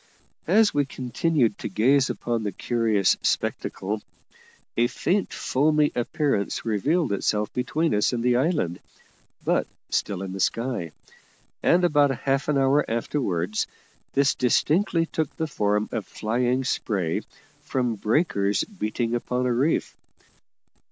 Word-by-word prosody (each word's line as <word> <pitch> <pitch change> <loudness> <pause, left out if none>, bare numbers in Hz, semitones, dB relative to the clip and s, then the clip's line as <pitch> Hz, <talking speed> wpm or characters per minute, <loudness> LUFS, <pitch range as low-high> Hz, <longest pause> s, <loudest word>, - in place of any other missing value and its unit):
As 210 +5 +4
we 145 - +3
continued 130 -2 0
to - - -4
gaze 130 +7 +3
upon 120 -1 -2
the 105 -2 -2
curious 110 -2 +1
spectacle, 105 +3 -1 0.7
a 120 +1 +3
faint 190 +9 -1
foamy 150 +2 +2
appearance 120 -3 -1
revealed 140 - +1
itself 105 +1 0
between 155 +6 0
us 105 0 +2
and 120 -2 -2
the 125 0 +3
island, 130 - 0 0.7
but - - +1 0.2
still 95 -2 -1
in 95 -1 -5
the 95 - -6
sky; 115 -4 -1 0.7
and 180 +1 +4
about 145 -4 +4
half 135 +1 -1
an 150 -2 +2
hour 135 +2 +3
afterwards 110 - -1 0.5
this 140 0 +3
distinctly 165 - +2
took 160 -3 -3
the 160 - -1
form 105 -7 0
of 110 - -3
flying 125 +4 0
spray 95 -9 -1 0.4
from 125 -3 -1
breakers 105 - +1
beating 120 - -3
upon 125 +1 -1
a 125 - +2
reef. 140 +7 0
125 Hz, 130 wpm, -25 LUFS, 105-145 Hz, 0.7 s, As